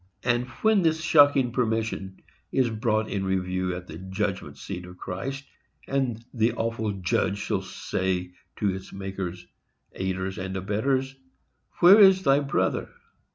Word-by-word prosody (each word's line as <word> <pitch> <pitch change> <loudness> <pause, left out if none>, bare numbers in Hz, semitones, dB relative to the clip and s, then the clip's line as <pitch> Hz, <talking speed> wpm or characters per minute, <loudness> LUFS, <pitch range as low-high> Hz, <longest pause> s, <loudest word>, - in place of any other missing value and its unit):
And, 125 0 +1 0.2
when 215 -2 +5
this 160 -2 +2
shocking 145 -5 +5
permission 110 -5 -2 0.3
is 125 -3 +2
brought 110 -1 0
in 100 -2 -2
review 95 -1 -1
at 90 0 -7
the 80 -1 -9
judgment 95 +1 -3
seat 90 -2 -6
of 90 0 -12
Christ, 135 +12 -5 0.4
and 125 -4 -1
the 115 0 +2
awful 115 -2 -2
Judge 95 +1 0
shall - - -1
say 90 -1 -2 0.2
to 100 -3 0
its 95 0 -8
makers, 95 -2 -5 0.5
aiders, 95 0 -3
and 95 0 -4
abettors, 130 +8 -1 0.7
Where 185 +4 +9
is 190 -2 +7
thy 135 -2 +4
brother? 140 -1 0
110 Hz, 140 wpm, -26 LUFS, 95-135 Hz, 0.7 s, Where